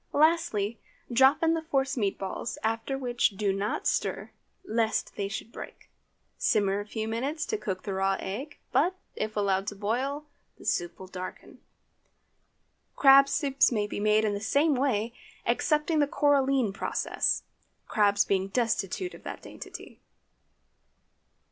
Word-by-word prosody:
Lastly, 285 -9 +2 0.3
drop 265 +6 +5
in 325 0 +4
the 325 - -1
force 270 -4 0
meat 205 -6 0
balls, 195 +3 -4
after 225 +4 -1
which 240 -6 0
do 200 -2 +1
not 200 +2 -2
stir, - - -1 0.3
lest 225 -4 0
they 200 - -2
should 220 +2 -6
break. - - -10 0.5
Simmer 200 -2 +2
a 205 - -6
few 220 0 -3
minutes 275 +9 -2
to 435 - -2
cook 190 - -4
the 200 - -3
raw 195 0 +1
egg; 260 +10 -5
but, 355 +5 +2 0.2
if 215 0 -3
allowed 195 -1 +1
to 205 - -3
boil, 255 +9 -2 0.3
the - - -14
soup 175 -1 -1
will 190 - -9
darken. 185 0 -8 1.4
Crab 275 0 +7
soup 275 -3 -1
may 210 -3 +1
be 205 - -5
made 215 +1 +3
in 210 - +1
the 200 - -3
same 290 +7 +3
way, 240 -4 0 0.3
excepting 305 +1 +1
the 290 - +3
coralline 275 -6 +2
process, - - 0 0.4
crabs 205 -2 +3
being 190 -1 +1
destitute 230 - -1
of - - -12
that - - -7
dainty. - - -10
225 Hz, 150 wpm, -28 LUFS, 200-275 Hz, 1.4 s, Crab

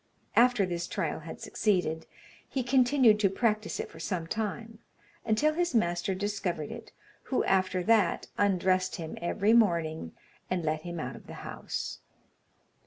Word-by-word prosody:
After 245 -4 +5
this 175 -1 -3
trial 170 -7 -2
had 160 +1 -9
succeeded, 180 -6 0 0.4
he 265 - -1
continued 250 -3 +4
to 200 -2 +4
practise 215 +1 0
it - - -3
for - - -12
some 180 -5 -2
time, 220 +3 -4 0.5
until 235 +8 +2
his 345 -3 0
master 175 -2 +1
discovered 190 -6 -2
it, - - -9 0.3
who 260 - 0
after 185 -1 +1
that 215 -3 +3
undressed 185 -2 +2
him 160 -2 -6
every 205 +5 +2
morning, 165 - +2 0.4
and 180 -3 -1
let 155 0 0
him 175 0 -6
out 130 -4 -4
of - - -13
the - - -8
house. - - -5
195 Hz, 150 wpm, -29 LUFS, 175-225 Hz, 0.5 s, After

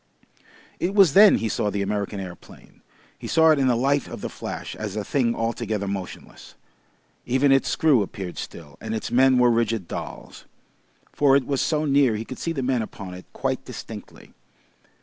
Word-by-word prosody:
It 190 +3 -1
was 190 -8 +6
then 205 +3 +8
he 115 - -2
saw 105 - -1
the 100 0 -2
American 100 0 -3
aeroplane. 90 -3 -11 0.4
He - - -7
saw 160 0 +5
it 155 - +3
in 135 - +2
the 125 - +3
light 140 +3 +1
of - - -8
the - - -5
flash - - -6
as 105 -2 -5
a 105 - -2
thing 120 +1 0
altogether 115 -3 -2
motionless. 95 -2 -7 0.7
Even 130 +3 +3
its 135 0 +3
screw 150 -8 +3
appeared 95 -2 -6
still, 75 -4 -9
and 110 0 -4
its 110 - -4
men 130 +1 +4
were 125 -1 +5
rigid 115 -5 0
dolls. - - -8 0.7
(For 140 -2 +4
it 140 -2 +2
was 140 -2 -1
so 155 -1 0
near 140 -5 +3
he 110 +2 -4
could 130 - -8
see 165 - -2
the 140 -5 -3
men 125 -2 +1
upon 100 -4 -8
it 90 0 -11
quite - - -2
distinctly.) - - -10
120 Hz, 190 wpm, -24 LUFS, 105-140 Hz, 0.7 s, then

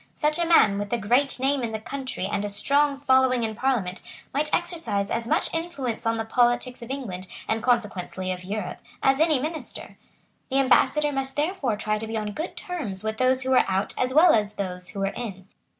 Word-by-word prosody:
Such 300 +1 0
a 340 - +1
man, 210 -12 +5
with 205 0 -4
a - - +3
great 245 +6 +1
name 270 +1 +1
in 230 -2 -3
the 220 - -2
country 260 -3 -5
and 200 +1 -1
a 205 - -2
strong 280 +8 +2
following 260 -3 +3
in 220 -1 -1
Parliament, 215 -6 -1 0.3
might 300 +2 0
exercise 280 - -1
as 230 0 -2
much - - 0
influence 280 -9 -3
on 225 0 +1
the 225 - -2
politics 245 +2 +1
of 235 - -9
England, 200 -10 -5 0.2
and 220 0 0
consequently 200 -6 -1
of 180 0 -5
Europe, 195 0 -4 0.2
as 270 +1 +4
any 320 -3 +4
minister. 310 +4 -5 0.5
The 270 - 0
Ambassador 275 +2 +3
must 270 -1 -1
therefore 295 - 0
try 215 0 -1
to 220 - -4
be 225 0 -3
on 210 -1 -3
good 315 - -5
terms 245 - -4
with 220 0 -2
those 255 0 +3
who 260 - -1
were 255 - +6
out 190 +1 0
as 255 0 0
well 315 +6 +6
as 210 -2 +2
with 210 - -23
those 180 -2 -4
who 195 - -6
were 195 +1 0
in. 195 -6 -6
245 Hz, 215 wpm, -25 LUFS, 210-275 Hz, 0.5 s, were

